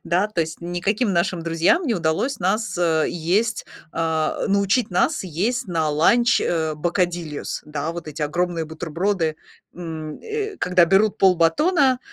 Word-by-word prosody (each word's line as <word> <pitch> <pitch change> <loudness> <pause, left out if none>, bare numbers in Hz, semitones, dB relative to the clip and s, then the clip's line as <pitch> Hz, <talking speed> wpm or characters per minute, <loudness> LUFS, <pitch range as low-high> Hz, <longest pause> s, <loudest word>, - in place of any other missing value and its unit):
Да, 180 +4 +1
то 210 -5 -2
есть 160 -1 -4
никаким 195 +6 -1
нашим 170 0 0
друзьям 165 - +2
не 240 - +1
удалось 170 - -1
нас, 200 +2 0
э, 160 -3 +2
есть 195 +7 0 0.3
а, 160 -1 -1
научить 200 +3 +2
нас 180 - +1
есть 195 +9 -1
на 165 -3 0
ланч, 235 +11 +3
э, 160 -2 -1
бокадильос. 170 -1 -2
Да, 150 +1 -3
вот 170 -2 -7
эти 150 0 -5
огромные 170 +2 -1
бутерброды, 160 +1 -2 0.4
м, 160 -3 -6
э, 430 -2 -4
когда 180 -1 +4
берут 195 +4 +3
полбатона, 245 - +3
175 Hz, 145 wpm, -22 LUFS, 160-205 Hz, 0.4 s, когда